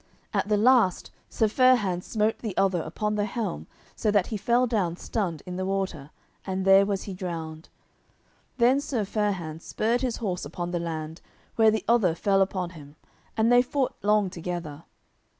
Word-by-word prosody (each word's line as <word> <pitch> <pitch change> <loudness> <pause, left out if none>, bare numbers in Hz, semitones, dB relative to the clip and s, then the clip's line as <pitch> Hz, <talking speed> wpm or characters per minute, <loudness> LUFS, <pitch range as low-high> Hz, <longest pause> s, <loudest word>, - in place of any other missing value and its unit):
At - - 0
the 210 - +3
last 225 -4 +3 0.2
Sir 220 - +1
Fair 255 +4 +5
hands 185 -6 -2
smote 215 0 0
the 215 -5 -5
other 190 -3 +2
upon 210 +7 -3
the 205 -1 0
helm 210 -3 -4 0.3
so 215 - 0
that 205 -3 +3
he 220 - -5
fell 240 +4 +2
down 195 -8 -1
stunned 180 -10 -3
in 180 0 -6
the 185 - -2
water, 190 -7 -3 0.3
and 190 0 -3
there 195 +1 +6
was 200 -2 -2
he 195 - -6
drowned. 165 -3 -6 0.9
Then 255 +3 +4
Sir 240 -7 -2
Fair 210 0 0
hands 165 -3 -7
spurred 230 +3 0
his 250 -3 -1
horse 185 -6 -3
upon 175 +4 -5
the 175 - -1
land, 160 -1 -5 0.3
where 225 -1 +5
the 215 -3 -1
other 220 -8 +3
fell 195 +2 +2
upon 185 -2 -1
him, 145 -4 -13 0.4
and 225 +2 +3
they 245 0 +7
fought 265 +1 -1
long 210 -2 +2
together. 170 -3 -6
195 Hz, 185 wpm, -26 LUFS, 175-220 Hz, 0.9 s, they